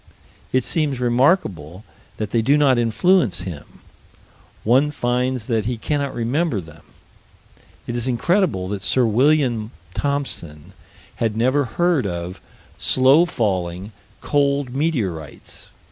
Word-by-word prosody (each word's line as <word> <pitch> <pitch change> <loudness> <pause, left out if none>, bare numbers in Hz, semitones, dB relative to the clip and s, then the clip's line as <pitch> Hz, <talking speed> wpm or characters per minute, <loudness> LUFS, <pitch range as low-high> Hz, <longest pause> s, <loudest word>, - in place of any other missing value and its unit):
It 130 -1 +2
seems 145 -4 0
remarkable 120 - +1 0.3
that 105 -1 -4
they 115 - +2
do 140 +6 +3
not 135 -4 +4
influence 115 - +2
him 85 -5 -9 0.8
one 130 +6 +3
finds 125 -3 -1
that 110 -3 0
he 120 +1 -2
cannot 140 +3 -2
remember 125 - 0
them. 80 -3 -12 1.0
It 120 - -4
is 120 +1 -1
incredible 130 - +1
that 100 -1 -3
Sir 125 +5 +2
William 120 -1 +2 0.2
Thomson 95 - -3 0.4
had 110 -2 -1
never 130 +5 +2
heard 160 - +1
of 90 +1 -5 0.4
slow 135 +7 +4
falling, 95 - -2 0.3
cold 140 -3 0
meteorites. 110 - -3
120 Hz, 115 wpm, -21 LUFS, 100-140 Hz, 1.0 s, not